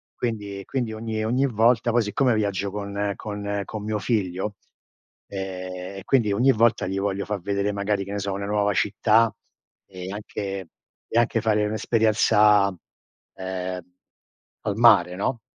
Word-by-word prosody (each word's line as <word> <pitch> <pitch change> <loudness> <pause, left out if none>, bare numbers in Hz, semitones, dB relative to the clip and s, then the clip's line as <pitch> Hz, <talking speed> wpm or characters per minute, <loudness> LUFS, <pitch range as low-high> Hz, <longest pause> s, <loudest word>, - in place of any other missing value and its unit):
Quindi 105 -5 -4
quindi, 120 -5 -2
ogni 110 0 -3
ogni 125 +5 +2
volta 115 0 +3
poi, 120 0 +3
siccome 120 +4 +1
viaggio 100 -2 -1
con 100 0 -3
con 100 -1 -4
con 110 -2 -6
mio 105 0 -2
figlio 100 -2 -1 0.7
ehm, 95 -1 -6
e - - -11
quindi, 115 -7 +3
ogni 125 +6 +4
volta 115 -3 +2
gli 95 +1 -2
voglio 100 0 -1
fa 105 -1 -2
vedere, 100 +2 -1
magari, 100 0 -1
che 100 - -8
ne 100 - -2
so, 100 0 -2
una 100 +1 -3
nuova 105 -1 +1
città, 110 +3 +3 0.5
e 95 0 -8
anche 100 -3 -5 0.4
e 115 - +2
anche 115 -1 +2
fare 105 -2 +2
un'esperienza, 110 -2 +4
uhm, 95 0 -7 0.8
al 100 - -1
mare, 100 -7 +6
no? 115 +4 -2
105 Hz, 150 wpm, -24 LUFS, 100-110 Hz, 0.8 s, mare